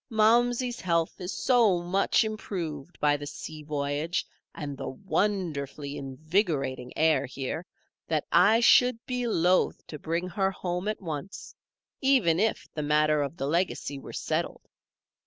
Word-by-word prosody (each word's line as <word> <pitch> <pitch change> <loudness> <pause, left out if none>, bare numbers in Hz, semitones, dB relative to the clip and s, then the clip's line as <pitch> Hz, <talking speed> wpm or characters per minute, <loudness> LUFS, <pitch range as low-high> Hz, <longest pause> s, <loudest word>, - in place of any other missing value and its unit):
Momsey's 240 +2 +3
health 170 -1 0
is 180 +1 -4
so 230 -8 +3
much 190 +6 +2
improved 175 -8 -5
by 145 -1 +3
the 145 0 -7
sea 155 +1 -8
voyage 150 +2 -2 0.3
and 145 -2 -5
the - - -5
wonderfully 150 -5 -2
invigorating 140 - -1
air 160 0 +3
here, 140 +7 -5 0.4
that 155 -2 0
I 205 +7 +5
should 250 0 +6
be 250 -1 -2
loath 180 -3 +2
to 150 - -8
bring 170 +4 -2
her 190 +1 +1
home 180 0 -3
at 215 -2 -3
once, 165 +4 -6 0.5
even 250 - +3
if 220 +2 0
the 155 - -3
matter 150 0 +3
of 145 +4 -3
the 135 - -2
legacy 150 -3 -1
were - - -10
settled. - - -2
170 Hz, 140 wpm, -28 LUFS, 150-205 Hz, 0.5 s, should